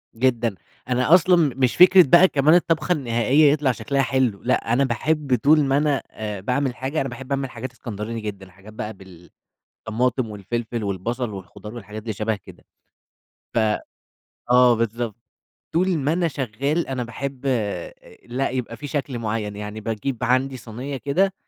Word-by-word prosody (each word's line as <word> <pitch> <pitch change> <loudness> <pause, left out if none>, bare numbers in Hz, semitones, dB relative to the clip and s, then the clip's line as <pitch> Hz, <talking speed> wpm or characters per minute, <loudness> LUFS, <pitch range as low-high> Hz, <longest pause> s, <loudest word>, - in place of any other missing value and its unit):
جدًا، 120 -3 +1 0.3
أنا 125 +5 +3
أصلًا 180 +1 +4 0.2
مش 130 -2 +1
فكرة 185 +1 +8
بقى 175 +6 +7
كمان 150 0 +3
الطبخة 170 0 +1
النهائية 140 0 +3
يطلع 145 -3 +2
شكلها 140 +3 -1
حلو، 130 -6 +1
لأ 120 -2 +1
أنا 135 - +3
باحب 135 +2 0
طول 150 +1 +5
ما 135 0 +2
أنا 145 -2 +1
آآ، 105 -3 -5
باعمل 125 +4 -1
حاجة، 135 +5 -2
أنا 135 - -2
باحب 135 +2 -9
أعمل 135 -1 -1
حاجات 120 +2 -7
إسكندراني 115 -2 -6
جدًا، 100 -3 -7
حاجات 100 +4 -15
بقى 110 0 -5 0.7
بالطماطم 120 +2 -2
والفلفل 110 +2 -4
والبصل 115 +5 -2
والخضار 100 +3 -9
والحاجات 110 -2 -8
دي 110 0 -3
شبه 110 +1 -1
كده. - - -16 0.9
ف - - -2 0.9
آه، 125 0 +6
بالضبط، 115 -1 -2 0.6
طول 180 +1 +2
ما 145 +1 0
أنا 175 0 +1
شغال 140 +3 -2
أنا 130 -2 -2
باحب 135 +3 -6 0.8
لأ 125 +3 -1
يبقى 125 -2 -4
في 145 - -7
شكل 140 -4 -3
معين، 105 -2 -3
يعني 105 +1 -6
باجيب 115 +3 -3
عندي 130 +2 +1
صَينية 125 +4 -6
كده 185 +9 +1
125 Hz, 155 wpm, -23 LUFS, 110-140 Hz, 0.9 s, فكرة